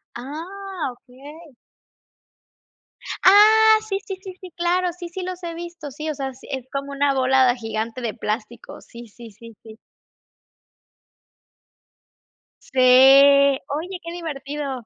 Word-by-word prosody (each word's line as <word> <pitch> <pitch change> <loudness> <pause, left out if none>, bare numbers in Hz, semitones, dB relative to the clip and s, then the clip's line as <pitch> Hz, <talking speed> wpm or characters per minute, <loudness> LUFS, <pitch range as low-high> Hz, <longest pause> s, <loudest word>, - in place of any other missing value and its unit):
Ah, 335 +5 -6
okey. 280 +4 -15 1.7
Ah, 435 +3 +7
sí, 390 -1 -2
sí, 385 - -5
sí, 380 - -8
sí, 370 -1 -12
claro. 350 +1 0
Sí, 350 -1 -8
sí 370 +2 -7
los 365 0 -7
he 335 -1 -5
visto. 340 -3 -9
Sí, 305 +4 -6
o 300 - -3
sea, 270 -1 -5
sí, 255 - -17
es 260 -2 -6
como 275 0 -5
una 280 0 +1
bola 260 -1 +3
gigante 225 +1 -5
de 230 -3 -3
plástico, 220 0 -6
sí, 235 0 -13
sí, 225 +1 -14
sí, 230 +2 -15
sí. 220 -1 -13 2.9
Sí. 265 - -5
Oye, 280 +6 +5
qué 335 - -7
divertido. 285 -6 -6
280 Hz, 130 wpm, -21 LUFS, 255-345 Hz, 2.9 s, Ah